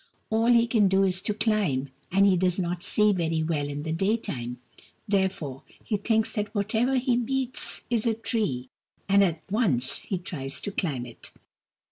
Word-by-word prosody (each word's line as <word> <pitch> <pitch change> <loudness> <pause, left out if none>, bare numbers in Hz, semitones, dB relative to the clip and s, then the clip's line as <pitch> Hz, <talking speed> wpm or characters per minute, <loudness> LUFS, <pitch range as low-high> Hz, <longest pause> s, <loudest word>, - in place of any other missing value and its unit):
All 225 +1 +2
he 235 -1 +5
can 225 -4 +3
do 190 +1 +3
is 185 -1 +1
to 210 - -1
climb, 200 - +1 0.2
and 195 +2 +5
he 195 -2 +5
does 180 0 +1
not 175 -1 -2
see 210 -1 +3
very 165 -3 0
well 155 -3 -1
in 145 +1 -4
the 160 - -3
daytime: 165 - -1 0.5
therefore, 190 -9 -1 0.2
he 215 - -1
thinks 220 +2 +1
that 210 0 -3
whatever 220 +6 +1
he 250 -1 +2
meets 260 +1 -1
is 235 -1 +1
a 225 - +2
tree, 210 - -2 0.4
and 200 0 +5
at 165 -4 -1
once 150 - +1
he 190 - -3
tries 140 -6 -5
to 205 - -4
climb 145 -11 -2
it. 120 -2 -12
195 Hz, 175 wpm, -26 LUFS, 160-220 Hz, 0.5 s, he